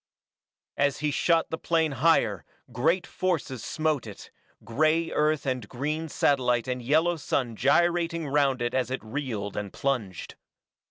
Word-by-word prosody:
As 140 -1 +2
he 150 -1 +1
shot 165 +3 +2
the 160 - -3
plane 160 -2 +1
higher, 160 +5 +2 0.3
great 165 +10 +1
forces 160 - -2
smote 155 -6 -1
it, 105 - -11 0.3
gray 155 +7 +1
Earth 150 0 +1
and 125 -5 -2
green 150 +5 -3
satellite 125 -5 +1
and 125 -1 -2
yellow 160 +7 +2
sun 125 -5 -2
gyrating 170 - +2
round 135 -3 +1
it 120 - -1
as 130 -2 0
it 130 -2 -4
reeled 110 -4 -4
and 100 -2 -4
plunged. 115 - -3
140 Hz, 145 wpm, -27 LUFS, 125-160 Hz, 0.3 s, As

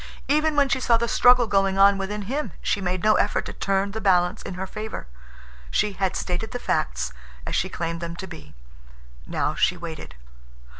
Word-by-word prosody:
Even 305 +1 +2
when 285 -1 +4
she 265 0 0
saw 235 -2 +3
the 235 +1 -1
struggle 245 +1 +5
going 195 -2 +1
on 200 +1 +6
within 200 +2 -4
him 275 +9 -3
she 200 - 0
made 185 0 -2
no 215 0 +5
effort - - +1
to - - -6
turn 195 0 0
the 220 +2 -5
balance 180 0 +2
in 185 - -7
her 190 +1 -4
favor. 215 +2 -6 0.6
She 205 - +1
had 190 -1 -1
stated 180 +5 -2
the 250 - -4
facts, - - -1 0.3
as - - -4
she 185 - 0
claimed 165 -1 -4
them 170 0 -5
to 190 - -6
be. 160 - -11 0.7
Now - - -1
she 180 - +1
waited. 160 - -8
195 Hz, 195 wpm, -24 LUFS, 175-220 Hz, 0.7 s, on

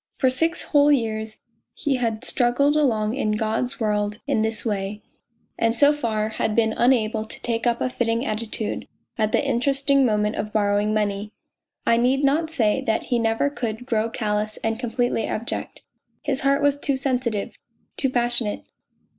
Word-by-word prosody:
For 260 -2 +3
six 325 +6 0
whole 290 0 +4
years 220 -4 -1 0.4
he 280 -4 0
had 230 -1 -2
struggled 260 +4 +2
along 225 -8 +2
in 215 -5 0
God's 220 +3 -1
world 210 -1 -1
in 215 - +1
this 220 +1 -1
way, 205 -1 -3 0.6
and 230 0 +1
so 290 +3 +6
far 220 -6 -1
had 220 0 -1
been 220 -1 +2
unable 225 -3 +2
to 220 - -7
take 230 0 -1
up 235 0 +1
a - - 0
fitting 240 -1 -1
attitude 215 -1 -3 0.3
at 215 -1 +1
the 290 - +1
interesting 275 +2 +2
moment 210 -3 +1
of 210 - -3
borrowing 205 0 +1
money! 210 -1 -1 0.5
I 230 - +4
need 260 +4 +2
not 305 +4 +2
say 225 -10 +1
that 220 - +1
he 240 - +3
never 225 +5 +1
could 235 -3 -4
grow 225 -3 0
callous 215 -2 -2
and 225 0 -1
completely 240 -2 -1
abject. 230 +2 -5 0.4
His 280 -2 0
heart 275 +1 +2
was 285 0 +2
too 280 -2 0
sensitive, 250 -6 -1 0.4
too 270 - 0
passionate 240 -3 0
230 Hz, 165 wpm, -23 LUFS, 215-265 Hz, 0.6 s, so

